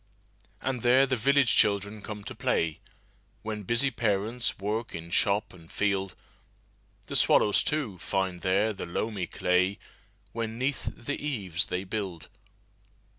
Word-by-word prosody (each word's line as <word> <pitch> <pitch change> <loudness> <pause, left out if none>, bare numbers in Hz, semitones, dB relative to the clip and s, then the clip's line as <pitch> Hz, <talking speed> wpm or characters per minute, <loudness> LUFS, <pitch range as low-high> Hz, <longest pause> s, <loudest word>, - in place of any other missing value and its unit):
And 130 -2 -2
there 130 +3 +5
the 130 -1 0
village 135 +2 +3
children 100 +1 +2
come 105 0 -7
to - - -6
play, 80 -2 0 0.6
When 110 -1 -4
busy 120 +7 +2
parents 110 +1 0
work 105 +3 -3
in 85 0 -8
shop 100 +3 +2
and 85 -3 -16
field. 95 -2 0 0.9
The - - -5
swallows, 105 - +5
too, 130 - -2
find 95 -2 -1
there 100 +4 +2
the 95 - -6
loamy 95 +1 -2
clayWhen 95 +4 -2
'neath 130 -3 -1
the 145 +4 -4
eaves 100 - 0
they 90 +1 -3
build. 95 -4 -5
105 Hz, 130 wpm, -28 LUFS, 95-120 Hz, 0.9 s, there